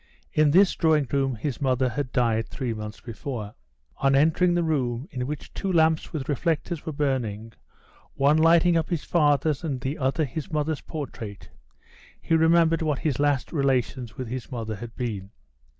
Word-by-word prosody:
In 155 Hz, -1 st, +4 dB
this 185 Hz, +5 st, +5 dB
drawing 155 Hz, -4 st, +2 dB
room 135 Hz, -2 st, +1 dB
his 135 Hz, +5 st, -4 dB
mother 130 Hz, -1 st, +2 dB
had 140 Hz, 0 st, -3 dB
died 115 Hz, -3 st, +1 dB
three 125 Hz, -5 st, -3 dB
months 105 Hz, -1 st, -7 dB
before. 115 Hz, -2 st, -6 dB, 0.4 s
On 135 Hz, 0 st, +3 dB
entering 165 Hz, +5 st, +3 dB
the 175 Hz, -, +2 dB
room, 130 Hz, -4 st, -1 dB
in 125 Hz, -1 st, -3 dB
which 150 Hz, 0 st, -6 dB
two 195 Hz, -, -2 dB
lamps 160 Hz, -2 st, +2 dB
with 150 Hz, -5 st, -4 dB
reflectors 160 Hz, +2 st, -1 dB
were -, -, -1 dB
burning, 120 Hz, -7 st, -2 dB, 0.6 s
one 140 Hz, +3 st, +4 dB
lighting 170 Hz, +2 st, +5 dB
up 165 Hz, -1 st, 0 dB
his 170 Hz, -4 st, -1 dB
father's 150 Hz, -2 st, +2 dB
and 140 Hz, -6 st, -2 dB
the 135 Hz, +5 st, -4 dB
other 135 Hz, +4 st, +1 dB
his 145 Hz, +5 st, -6 dB
mother's 155 Hz, 0 st, -1 dB
portrait, 115 Hz, -9 st, -7 dB, 0.7 s
he 165 Hz, -, -2 dB
remembered 165 Hz, 0 st, +4 dB
what 150 Hz, -3 st, 0 dB
his 145 Hz, -4 st, 0 dB
last 145 Hz, -2 st, +1 dB
relations 130 Hz, -4 st, 0 dB
with 130 Hz, -3 st, -4 dB
his 130 Hz, +3 st, -6 dB
mother 110 Hz, -3 st, -4 dB
had 115 Hz, +1 st, -9 dB
been. 105 Hz, -6 st, -4 dB
140 Hz, 170 wpm, -25 LUFS, 125-160 Hz, 0.7 s, this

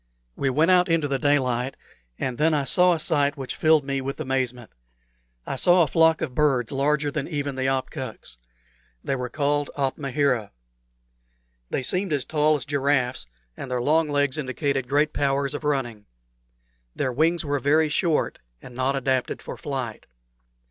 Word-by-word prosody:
We 135 Hz, -, 0 dB
went 155 Hz, +7 st, +3 dB
out 180 Hz, -1 st, +4 dB
into 165 Hz, -3 st, +2 dB
the 135 Hz, -1 st, -1 dB
daylight, 130 Hz, -3 st, +1 dB, 0.4 s
and 125 Hz, -2 st, -3 dB
then 155 Hz, +1 st, +3 dB
I 145 Hz, -, +1 dB
saw 180 Hz, +5 st, +4 dB
a 165 Hz, -, -2 dB
sight 145 Hz, -2 st, +1 dB
which 130 Hz, -3 st, -4 dB
filled 155 Hz, -2 st, +4 dB
me 135 Hz, -1 st, -2 dB
with 135 Hz, +3 st, -5 dB
amazement. 130 Hz, -4 st, -2 dB, 0.7 s
I 135 Hz, -, -4 dB
saw 175 Hz, +4 st, +5 dB
a -, -, 0 dB
flock 160 Hz, +2 st, +3 dB
of 130 Hz, -, -3 dB
birds 135 Hz, -5 st, +1 dB
larger 145 Hz, +1 st, 0 dB
than 140 Hz, -1 st, -3 dB
even 145 Hz, -3 st, -3 dB
the 130 Hz, 0 st, -2 dB
opkuks. 130 Hz, -, -5 dB, 0.7 s
They 135 Hz, -, -1 dB
were 125 Hz, -1 st, -4 dB
called 145 Hz, +1 st, 0 dB
"opmahera." 135 Hz, -4 st, 0 dB, 1.2 s
They 130 Hz, -, -2 dB
seemed 185 Hz, +4 st, +1 dB
as 140 Hz, -3 st, 0 dB
tall 155 Hz, 0 st, +2 dB
as 140 Hz, -, -4 dB
giraffes, 135 Hz, -, 0 dB, 0.3 s
and 135 Hz, -, -7 dB
their 125 Hz, -1 st, -1 dB
long 155 Hz, +5 st, +2 dB
legs 145 Hz, 0 st, +1 dB
indicated 135 Hz, -1 st, -2 dB
great 145 Hz, +2 st, +2 dB
powers 140 Hz, 0 st, 0 dB
of 145 Hz, -, -5 dB
running. 125 Hz, -8 st, -2 dB, 0.9 s
Their 130 Hz, -, -1 dB
wings 165 Hz, +5 st, +1 dB
were 145 Hz, -1 st, 0 dB
very 150 Hz, +4 st, +2 dB
short, 160 Hz, +1 st, 0 dB, 0.2 s
and 125 Hz, -, -12 dB
not 130 Hz, +2 st, 0 dB
adapted 130 Hz, -1 st, -1 dB
for -, -, -8 dB
flight. 130 Hz, -6 st, -5 dB
140 Hz, 165 wpm, -24 LUFS, 130-150 Hz, 1.2 s, saw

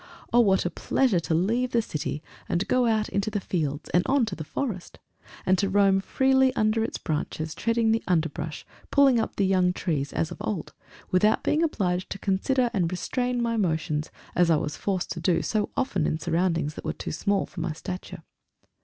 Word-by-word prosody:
Oh! 240 Hz, -, +6 dB
what 195 Hz, -6 st, +4 dB
pleasure 245 Hz, -10 st, +2 dB
to 160 Hz, 0 st, -1 dB
leave 230 Hz, +9 st, +1 dB
the 235 Hz, -, +4 dB
city, 150 Hz, -4 st, -4 dB, 0.3 s
and 180 Hz, +2 st, 0 dB
go 250 Hz, -1 st, +3 dB
out 220 Hz, -2 st, +1 dB
into 200 Hz, +2 st, -1 dB
the 210 Hz, -, -2 dB
fields 155 Hz, -6 st, -2 dB
and 175 Hz, -, +4 dB
on 270 Hz, -3 st, +3 dB
to 205 Hz, -4 st, -4 dB
the 155 Hz, -, -6 dB
forest! 190 Hz, -, -4 dB, 0.5 s
and 185 Hz, 0 st, +3 dB
to 200 Hz, -, +1 dB
roam 195 Hz, -1 st, +4 dB
freely 265 Hz, +5 st, +3 dB
under 215 Hz, 0 st, +2 dB
its -, -, -3 dB
branches, 155 Hz, 0 st, -3 dB
treading 230 Hz, 0 st, +1 dB
the 225 Hz, 0 st, +2 dB
underbrush, 160 Hz, -3 st, -1 dB, 0.2 s
pulling 275 Hz, -4 st, +5 dB
up -, -, -2 dB
the 200 Hz, -, +2 dB
young 185 Hz, -1 st, +3 dB
trees, 145 Hz, -6 st, -2 dB
as 160 Hz, -, -1 dB
of -, -, -7 dB
old, 210 Hz, -6 st, -3 dB, 0.4 s
without 210 Hz, +4 st, +3 dB
being 305 Hz, -, +2 dB
obliged 185 Hz, -, 0 dB
to -, -, -4 dB
consider 235 Hz, +6 st, +1 dB
and 180 Hz, -5 st, +1 dB
restrain 245 Hz, +6 st, -1 dB
my 230 Hz, -1 st, 0 dB
motions, 160 Hz, -5 st, -1 dB, 0.2 s
as 175 Hz, -1 st, +3 dB
I 165 Hz, -, +5 dB
was 150 Hz, 0 st, -2 dB
forced 190 Hz, -3 st, -2 dB
to 170 Hz, -, -4 dB
do 170 Hz, 0 st, +1 dB
so 215 Hz, -2 st, 0 dB
often 200 Hz, -, 0 dB
in -, -, 0 dB
surroundings 165 Hz, -2 st, 0 dB
that -, -, -9 dB
were -, -, -2 dB
too -, -, -6 dB
small 200 Hz, +5 st, 0 dB
for 175 Hz, -, -8 dB
my 170 Hz, 0 st, -1 dB
stature. 180 Hz, +3 st, -7 dB
190 Hz, 200 wpm, -26 LUFS, 165-225 Hz, 0.5 s, Oh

